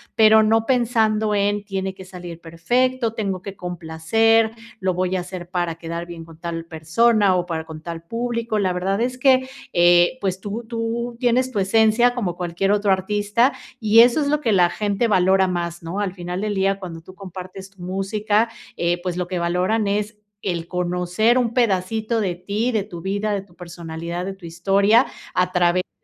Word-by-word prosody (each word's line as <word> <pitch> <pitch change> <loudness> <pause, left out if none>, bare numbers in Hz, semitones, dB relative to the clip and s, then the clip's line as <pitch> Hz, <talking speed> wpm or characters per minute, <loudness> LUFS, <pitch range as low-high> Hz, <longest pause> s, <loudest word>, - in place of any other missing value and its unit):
pero 220 0 +7
no 225 +1 +2
pensando 220 -4 +2
en: 205 0 +1
"Tiene 190 -1 -3
que 190 0 -12
salir 175 -2 -9
perfecto, 235 +9 0
tengo 195 -5 -3
que 200 0 -8
complacer, 180 +7 +1 0.3
lo 185 -1 0
voy 185 +1 -1
a - - 0
hacer 180 -1 -8
para 175 -2 -1
quedar 170 +1 -5
bien 170 -1 -9
con 165 -1 -15
tal 165 -1 -5
persona, 190 +6 +2
o 180 -1 0
para 160 -2 -4
con 160 -1 -9
tal 165 0 -7
público". 230 +3 -2
La 190 -3 +1
verdad, 190 +4 -1
es 250 +1 -1
que, 260 -1 +3 0.2
eh, 175 +5 +5
pues 190 -2 -1
tú 210 +4 -5
tú 235 +1 -3
tienes 250 +1 +2
tu 215 - -1
esencia, 220 +4 +3
como 200 -8 -2
cualquier 180 +2 -1
otro 205 -1 +2
artista, 205 +6 +1 0.3
y 220 0 +5
eso 245 +6 +6
es 285 - 0
lo 300 +1 +1
que 230 - +1
la 180 -2 +4
gente 205 +4 0
valora 190 -2 +3
más, 170 -1 -3
¿no? 170 +5 -4
Al 200 -3 -1
final 180 0 -5
del 210 -1 -2
día, 195 0 +1
cuando 170 -4 -8
tú 185 +3 -14
compartes 190 0 -9
tu 195 -2 -18
música, 205 +4 0 0.3
eh, 175 +1 0
pues, 180 -1 -3
lo 180 -1 -2
que 180 -1 -3
valoran, 180 +5 0
es 210 +2 -1 0.2
el 170 -3 -3
conocer 180 +6 +1
un 240 -2 +1
pedacito 220 0 0
de 185 -4 -1
ti, 205 +7 -2
de 215 -4 0
tu 175 -3 -9
vida, 205 +3 -1
de 200 - -1
tu 185 -3 -21
personalidad, 170 0 -6
de 195 - -4
tu 190 -2 -14
historia, 200 +7 +3 0.3
a 180 0 +1
través 180 0 +2
de - - -58
195 Hz, 195 wpm, -22 LUFS, 175-220 Hz, 0.3 s, pero